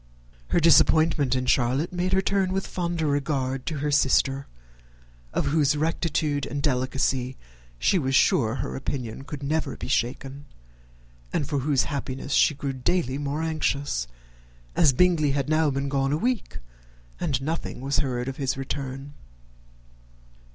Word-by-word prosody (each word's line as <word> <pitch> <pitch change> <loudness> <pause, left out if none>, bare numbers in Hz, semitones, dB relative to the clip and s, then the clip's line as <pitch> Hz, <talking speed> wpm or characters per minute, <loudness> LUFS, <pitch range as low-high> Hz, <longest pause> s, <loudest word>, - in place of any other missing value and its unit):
Her - - +2
disappointment 155 -3 +4
in 130 0 -1
Charlotte 130 +6 +1
made 180 +1 -1
her 190 0 +3
turn 195 -1 +1
with 195 0 -1
fonder 170 -2 -2
regard 135 -2 -1
to 155 - -2
her 145 +1 -1
sister, 135 -1 +2 0.8
of - - -1
whose 150 -1 +2
rectitude 155 -2 0
and 145 - -4
delicacy 130 -1 0 0.4
she 180 - +2
was 135 -3 0
sure 115 -3 +3
her 130 - -4
opinion 130 -3 -4
could 145 0 -7
never 150 -1 -1
be - - -6
shaken, 135 +2 -2 0.9
and 145 - -1
for 145 -2 -1
whose 135 -1 +2
happiness 140 0 -4
she 150 - +4
grew 140 -1 -3
daily 130 +1 -1
more 145 +2 -2
anxious, 145 - -1 0.7
as 150 - +5
Bingley 155 -1 +3
had 140 0 -1
now 155 -1 +3
been 140 0 -2
gone 135 0 0
a 150 - +1
week, 245 +6 -2 0.6
and 145 -7 0
nothing 155 +1 -4
was 135 +2 -1
heard 125 -3 -1
of 135 - -4
his 135 -2 -1
return. 135 +1 -5
140 Hz, 150 wpm, -25 LUFS, 135-155 Hz, 0.9 s, as